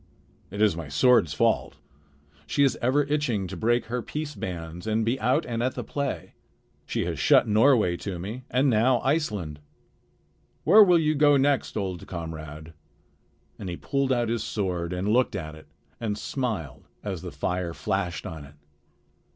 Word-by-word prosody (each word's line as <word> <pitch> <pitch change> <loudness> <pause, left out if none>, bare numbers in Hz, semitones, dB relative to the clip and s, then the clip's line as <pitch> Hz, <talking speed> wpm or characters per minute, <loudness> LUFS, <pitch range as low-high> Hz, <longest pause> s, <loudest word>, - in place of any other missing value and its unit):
It 100 +3 -1
is 105 -6 +3
my 85 -2 -6
sword's 85 - +4
fault. - - +1 0.7
She 140 - +2
is 135 -3 +3
ever 130 +4 +3
itching 140 -9 -1
to 95 +1 -6
break 120 +6 +1
her 120 +2 -3
peace 150 +4 -5
bands 85 - -6
and 110 0 +1
be 120 +4 0
out 130 +7 +1
and 115 -1 -3
at 130 +2 -1
the - - -4
play. 140 -1 -4 0.5
She - - -1
has - - -3
shut - - +5
Norway 110 -4 +4
to 95 -1 -5
me 105 +9 -6
and 130 +3 +2
now 120 +1 +3
Iceland. 105 - -1 1.0
Where 210 +7 +8
will 180 -3 +5
you 155 -2 +2
go 145 -1 +5
next, 140 -3 +1
old 95 -4 -4
comrade?" 80 -2 -7 0.9
and 95 - -5
he 85 - -4
pulled 140 -1 -1
out 120 -3 +1
his 115 -1 -1
sword 90 -4 -2
and 90 +2 -2
looked 125 +4 +2
at 80 0 -5
it 80 0 -14 0.3
and 105 -3 -2
smiled 110 - -4 0.2
as - - -4
the - - -6
fire 90 -1 -2
flashed 90 -5 -2
on 80 -3 -7
it. 70 +1 -14
110 Hz, 170 wpm, -26 LUFS, 85-130 Hz, 1.0 s, Where